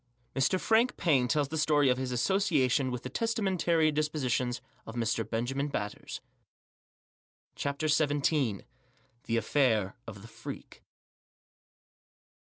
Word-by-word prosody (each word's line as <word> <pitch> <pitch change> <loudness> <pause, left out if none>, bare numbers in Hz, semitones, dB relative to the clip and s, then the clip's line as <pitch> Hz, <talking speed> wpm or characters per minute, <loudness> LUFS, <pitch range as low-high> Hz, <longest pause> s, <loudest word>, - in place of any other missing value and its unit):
MR 135 +8 +2
FRANK 230 +5 +2
PAINE 135 -8 +3
TELLS 145 +1 +1
THE 160 +1 -2
STORY 150 -2 +3
OF 125 0 +2
HIS 130 -1 -3
ASSOCIA 150 - +2
TION 130 +1 +1
WITH 125 -1 -4
THE 130 - -5
TESTAMENTARY 185 - +1
DISPOSITIONS 135 -5 -1 0.3
OF 110 - -7
MR, 115 -1 -1
BENJAMIN 130 +5 -1
BATTERS. 145 - -5 1.3
CHAPTER 140 +2 -2
XVII. 145 - +1 0.6
THE 115 0 0
AFFAIR 110 -4 +1
OF 100 -3 -9
THE - - -10
FREAK. - - -9
140 Hz, 120 wpm, -30 LUFS, 120-155 Hz, 1.3 s, PAINE